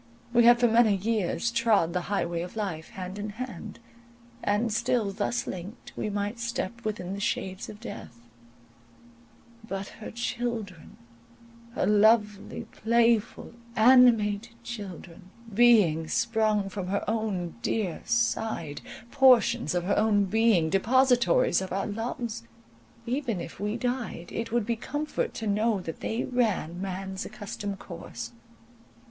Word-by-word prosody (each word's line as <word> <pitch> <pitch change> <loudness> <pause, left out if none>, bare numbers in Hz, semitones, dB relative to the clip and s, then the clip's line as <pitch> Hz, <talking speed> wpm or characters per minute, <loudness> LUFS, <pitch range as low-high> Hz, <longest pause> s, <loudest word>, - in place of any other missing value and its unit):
We 240 -1 +5
had 240 0 +7
for 240 - +5
many 225 -2 +4
years 215 +2 0
trod 220 -8 +2
the 180 - 0
highway 170 -4 -1
of 180 +4 -7
life 185 -8 -4
hand 185 +1 -7
in 210 +1 -4
hand, 225 -1 -7 0.7
and 210 +2 +1
still 235 -2 +1
thus 120 -9 -1
linked, 190 +6 -8
we - - -2
might 205 +3 -3
step 235 -1 -3
within 195 -4 -3
the 200 - -5
shades 190 -1 -2
of 210 - -10
death; 215 - -9 1.5
but 195 -2 -5
her 215 - -7
children, 235 -7 -4 0.8
her - - +1
lovely, 210 0 +3
playful, 230 0 +1 0.2
animated 230 -2 +5
children—beings 195 -2 +1
sprung 220 -3 +1
from 195 -1 -5
her 200 +2 -2
own 205 - -2
dear 190 - -1
side—portions 230 - +1
of 175 - 0
her 200 +3 +1
own 210 -2 +3
being—depositories 230 - +3
of 190 - -5
our 195 +1 -1
loves—even 210 - -5
if 170 - -8
we 210 +3 -2
died, 245 -8 -3
it 230 0 -4
would 235 -2 +1
be 235 +1 0
comfort 290 +6 -3
to 225 - -4
know 210 +1 +1
that 165 -3 -7
they 225 +2 -2
ran 210 -9 -1
man's 190 +1 -4
accustomed 205 -1 -6
course. 215 +6 -8
210 Hz, 125 wpm, -27 LUFS, 190-235 Hz, 1.5 s, had